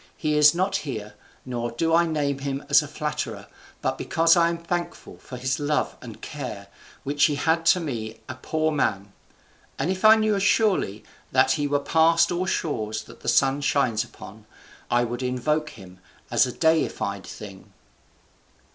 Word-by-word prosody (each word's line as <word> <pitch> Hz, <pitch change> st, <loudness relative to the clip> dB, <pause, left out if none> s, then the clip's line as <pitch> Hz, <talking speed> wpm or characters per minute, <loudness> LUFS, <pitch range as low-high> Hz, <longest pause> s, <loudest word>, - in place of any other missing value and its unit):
He 155 Hz, -1 st, -1 dB
is 150 Hz, +1 st, +6 dB
not 190 Hz, +2 st, +1 dB
here, 110 Hz, -, -6 dB, 0.3 s
nor 120 Hz, -2 st, -3 dB
do 160 Hz, +8 st, -1 dB
I 170 Hz, +1 st, +4 dB
name 145 Hz, -3 st, -1 dB
him 135 Hz, 0 st, -4 dB
as 145 Hz, 0 st, +6 dB
a 150 Hz, -, -7 dB
flatterer, 150 Hz, +1 st, -4 dB, 0.4 s
but -, -, -1 dB
because 165 Hz, +1 st, +3 dB
I 170 Hz, -1 st, +4 dB
am 170 Hz, -, -2 dB
thankful 175 Hz, +1 st, -5 dB
for 125 Hz, -, -9 dB
his 130 Hz, +3 st, -1 dB
love 150 Hz, +1 st, -1 dB
and 115 Hz, -3 st, -10 dB
care 115 Hz, -9 st, -7 dB, 0.3 s
which 145 Hz, +1 st, +2 dB
he 150 Hz, -, +1 dB
had 165 Hz, +3 st, 0 dB
to 180 Hz, -, +5 dB
me 115 Hz, -9 st, -5 dB
a 130 Hz, -, -5 dB
poor 155 Hz, +4 st, -1 dB
man; 100 Hz, -9 st, -1 dB, 0.6 s
and 180 Hz, -, -1 dB
if 190 Hz, +1 st, -4 dB
I 215 Hz, 0 st, +9 dB
knew 215 Hz, -2 st, +1 dB
surely 195 Hz, -, +1 dB, 0.3 s
that 130 Hz, 0 st, +4 dB
he 145 Hz, 0 st, 0 dB
were 145 Hz, 0 st, +1 dB
past 165 Hz, +4 st, +3 dB
all 180 Hz, +1 st, -1 dB
shores 110 Hz, -11 st, -2 dB
that -, -, -15 dB
the -, -, -11 dB
sun 135 Hz, +1 st, +3 dB
shines 130 Hz, -6 st, +1 dB
upon, 110 Hz, -2 st, -13 dB, 0.4 s
I 120 Hz, 0 st, +3 dB
would 120 Hz, +1 st, -4 dB
invoke 140 Hz, +5 st, -1 dB
him 95 Hz, -3 st, -14 dB, 0.3 s
as -, -, +4 dB
a -, -, -4 dB
deified 150 Hz, -, 0 dB
thing." 100 Hz, -3 st, -11 dB
145 Hz, 175 wpm, -24 LUFS, 120-165 Hz, 0.6 s, I